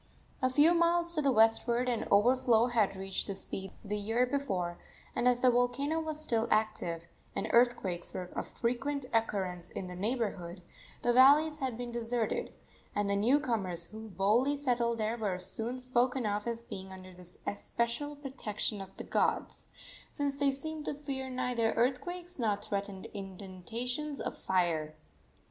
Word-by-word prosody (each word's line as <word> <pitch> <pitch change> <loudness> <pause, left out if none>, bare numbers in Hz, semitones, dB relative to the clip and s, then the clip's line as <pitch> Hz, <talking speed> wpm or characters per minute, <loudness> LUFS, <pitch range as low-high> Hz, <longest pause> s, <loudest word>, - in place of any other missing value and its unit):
A 255 - +3
few 295 +6 +5
miles 340 0 +3
to 310 - +1
the 280 -2 +3
westward 235 +2 +4
an 240 -2 0
overflow 240 +1 +5
had 220 -5 +2
reached 190 0 -3
the 200 - -3
sea 190 0 -3
the 210 +1 -2
year 225 +4 +2
before, 195 -11 -2 0.4
and 245 - +2
as 245 0 +3
the 255 - +6
volcano 245 +6 +1
was 310 -1 -4
still 235 -7 0
active, 215 -6 0 0.3
and - - -1
earthquakes 235 -8 +2
were 180 -1 -5
of - - -3
frequent 265 +4 -2
occurrence 190 -6 0
in - - -5
the 180 0 -7
neighborhood, 195 -4 -2 0.4
the 240 - +3
valleys 295 +5 +6
had 260 -5 -2
been 245 0 -5
deserted, 235 -1 -1 0.4
and 205 -1 +1
the - - +2
new 240 +8 +4
comers 190 - -2
who 220 0 -8
boldly 215 +10 +2
settled 240 -4 +1
there 220 +2 -1
were 200 -4 -1
soon 225 +7 -3
spoken 255 0 +1
of 210 +1 -1
as 235 0 -3
being 190 -3 -7
under 185 0 -10
the 180 0 -11
especial 235 +7 -2
protection 225 -7 -3
of 195 0 -11
the - - -5
gods, - - 0 0.4
since 285 -2 -1
they 280 0 +2
seemed 300 +3 -4
to - - -2
fear 270 -2 -5
neither 250 -3 0
earthquakes 345 +8 -1
nor 215 -4 +2
threatened 200 -1 -4
inundations 215 +9 -5
of - - -3
fire. 165 -5 0
235 Hz, 160 wpm, -32 LUFS, 200-265 Hz, 0.4 s, the